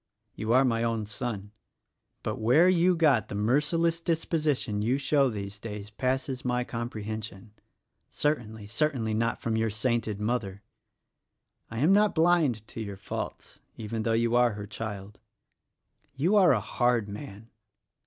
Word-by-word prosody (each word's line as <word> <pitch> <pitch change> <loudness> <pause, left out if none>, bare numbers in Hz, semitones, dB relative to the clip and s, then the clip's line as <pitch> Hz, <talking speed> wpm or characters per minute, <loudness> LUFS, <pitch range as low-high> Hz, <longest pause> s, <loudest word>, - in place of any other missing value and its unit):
You 110 +1 -3
are 130 +2 +5
my 115 -2 +1
own 115 -2 -1
son; 105 -2 -5 0.7
but - - -2
where 125 +11 +5
you 180 0 +4
got 150 -9 +3
the - - -6
merciless 150 +10 +1
disposition 150 -9 0
you 120 +5 +1
show 140 -1 +2
these 100 -2 -6
days 105 -1 -7
passes 130 +3 -2
my 125 0 0
comprehension, 110 -3 -6 0.3
— - - -56 0.2
certainly, 110 -8 -2
certainly 115 -1 0
not 115 +2 0
from 115 -1 0
your 110 0 +1
sainted 110 -1 -1
mother! 105 -3 -2 1.1
I 115 - -7
am 165 +7 +5
not 210 +1 +4
blind 160 -10 +2
to 115 - -6
your 100 -2 -6
faults - - -6
— - - -41
even 110 0 -4
though 115 +1 0
you 115 +1 +2
are 120 -2 +4
her 105 0 -6
child. 105 -1 -7 1.0
You 170 +10 +2
are 190 -4 +6
a 125 - +3
hard 120 0 +1
man. 105 +1 -9
115 Hz, 155 wpm, -28 LUFS, 105-140 Hz, 1.1 s, are